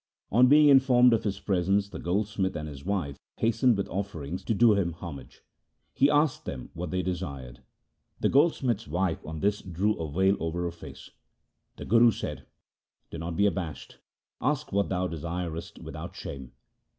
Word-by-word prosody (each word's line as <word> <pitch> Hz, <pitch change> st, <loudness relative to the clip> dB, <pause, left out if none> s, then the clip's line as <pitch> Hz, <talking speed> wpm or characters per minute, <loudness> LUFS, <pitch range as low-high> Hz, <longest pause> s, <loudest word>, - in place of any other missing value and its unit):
On 125 Hz, +4 st, +6 dB
being 150 Hz, +2 st, +7 dB
informed 125 Hz, -3 st, +6 dB
of 115 Hz, -, 0 dB
his 100 Hz, -2 st, -2 dB
presence 100 Hz, +1 st, +1 dB
the -, -, -8 dB
goldsmith 95 Hz, +1 st, -1 dB
and 75 Hz, 0 st, -4 dB
his 70 Hz, -2 st, -9 dB
wife 90 Hz, -9 st, -2 dB, 0.2 s
hastened 115 Hz, +1 st, +2 dB
with 100 Hz, -, -2 dB
offerings 90 Hz, -4 st, -4 dB
to 115 Hz, -, 0 dB
do 115 Hz, +1 st, +6 dB
him 95 Hz, -4 st, 0 dB
homage. 80 Hz, -6 st, -10 dB, 0.5 s
He 140 Hz, -, +4 dB
asked 150 Hz, -1 st, +2 dB
them 65 Hz, -3 st, -6 dB
what 85 Hz, 0 st, -5 dB
they 90 Hz, +1 st, -1 dB
desired. 70 Hz, -9 st, -5 dB, 0.6 s
The -, -, +2 dB
goldsmith's 130 Hz, -, +2 dB
wife 90 Hz, +1 st, -1 dB
on 80 Hz, -1 st, -7 dB
this 105 Hz, +1 st, +1 dB
drew 95 Hz, +4 st, -1 dB
a 80 Hz, -3 st, -4 dB
veil 95 Hz, +5 st, +2 dB
over 80 Hz, +2 st, -2 dB
her 85 Hz, -, -2 dB
face. 75 Hz, -5 st, -12 dB, 0.6 s
The -, -, -8 dB
Guru 115 Hz, +2 st, +6 dB
said, -, -, -5 dB, 0.3 s
' -, -, -54 dB
Be 85 Hz, -, -6 dB
not 85 Hz, 0 st, -5 dB
abashed. 95 Hz, -7 st, -1 dB, 0.4 s
Ask 150 Hz, +3 st, -1 dB
what 100 Hz, 0 st, +1 dB
thou 90 Hz, -1 st, 0 dB
desirest 85 Hz, 0 st, -5 dB
without -, -, -8 dB
shame.' 65 Hz, -3 st, -8 dB
95 Hz, 170 wpm, -28 LUFS, 80-110 Hz, 0.6 s, being